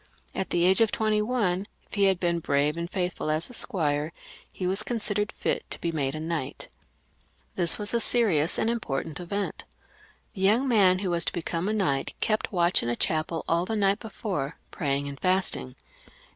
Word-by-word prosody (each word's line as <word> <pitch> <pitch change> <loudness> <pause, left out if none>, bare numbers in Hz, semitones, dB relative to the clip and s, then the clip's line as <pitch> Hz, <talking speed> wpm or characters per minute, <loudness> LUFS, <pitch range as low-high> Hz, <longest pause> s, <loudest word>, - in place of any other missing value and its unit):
At 190 - -3
the 175 0 +2
age 190 +5 +4
of 225 - +4
twenty 215 -1 +1
one, 205 -5 0 0.2
if - - -22
he 200 -2 +3
had 190 -2 +3
been 170 -2 +1
brave 145 -1 +1
and 170 0 -4
faithful 180 -4 -2
as 155 +7 -1
a - - -12
squire, 155 -10 0 0.4
he 185 - -5
was 190 +3 +4
considered 210 -2 -1
fit - - -2
to - - -5
be 170 - -1
made 140 -3 -1
a - - -4
knight 160 -4 -4 0.8
This 170 -2 +1
was 205 +1 -1
a 235 - +3
serious 195 -10 +2
and - - +1
important 165 -10 -2
event. 200 +3 -3 0.7
The 190 - -5
young 220 +8 +4
man 195 -7 +5
who 180 - 0
was 170 -1 +3
to - - 0
become 170 +1 -2
a - - 0
knight 140 -11 0
kept 215 0 0
watch 175 -2 +3
in 120 - -2
a 120 - 0
chapel 160 +4 -1
all 170 +1 +2
the 225 - -1
night 200 -1 +2
before, 190 - -4
praying 140 -3 -1
and 140 -1 -7
fasting. 185 - +2
180 Hz, 195 wpm, -27 LUFS, 155-210 Hz, 0.8 s, man